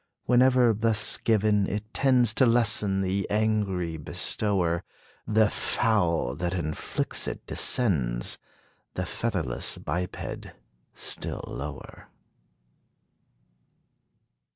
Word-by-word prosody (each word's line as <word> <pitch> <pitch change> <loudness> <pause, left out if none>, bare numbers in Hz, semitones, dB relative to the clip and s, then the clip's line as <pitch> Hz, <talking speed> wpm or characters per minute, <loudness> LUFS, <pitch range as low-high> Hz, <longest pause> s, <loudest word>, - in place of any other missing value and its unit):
Whenever 125 -1 +4
thus 110 +1 +2
given, 105 -2 +2
it 105 +2 -5
tends 125 -4 +3
To 130 - +4
lessen 105 -4 +3
the 95 +1 -2
angry 100 -6 -1
bestower; 85 +2 -1 0.4
The 110 0 +3
fowl 90 - 0
that 90 +1 -2
inflicts 80 -4 -1
it, - - -6
descends 65 - +1 0.6
The - - -2
featherless 90 - -2
biped, 90 +4 -5 0.5
still - - -3
lower. 70 -2 -9
100 Hz, 85 wpm, -26 LUFS, 85-110 Hz, 0.6 s, Whenever